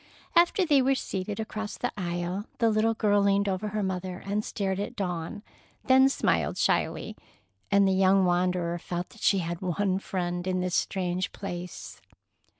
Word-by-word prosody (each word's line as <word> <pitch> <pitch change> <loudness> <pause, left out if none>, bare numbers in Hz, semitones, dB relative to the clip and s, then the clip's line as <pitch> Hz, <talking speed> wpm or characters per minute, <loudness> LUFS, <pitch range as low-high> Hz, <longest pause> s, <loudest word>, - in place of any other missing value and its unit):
After 345 +2 +4
they 290 -4 +4
were 270 +1 +3
seated, 200 -3 -4
across 215 -1 -4
the - - -2
aisle, 175 +1 -3
the 230 -1 +3
little 220 +1 +2
girl 205 -2 +3
leaned 200 0 +2
over 195 +2 -1
her 210 0 -2
mother 185 -1 -3
and 205 +2 -1
stared 195 -3 -2
at 205 - -4
Dawn, 180 0 -4 0.4
then 265 +1 +6
smiled - - 0
shyly, - - 0 0.5
and 200 -1 +4
the 190 - +3
young 190 0 +4
wanderer 175 -1 +1
felt 175 +1 -4
that 220 - -17
she 200 - +4
had 170 0 -4
one 190 +1 0
friend 175 -2 -3
in 185 0 0
this 180 -1 -2
strange 185 -1 -1
place. 180 -3 -7
190 Hz, 165 wpm, -27 LUFS, 180-210 Hz, 0.5 s, then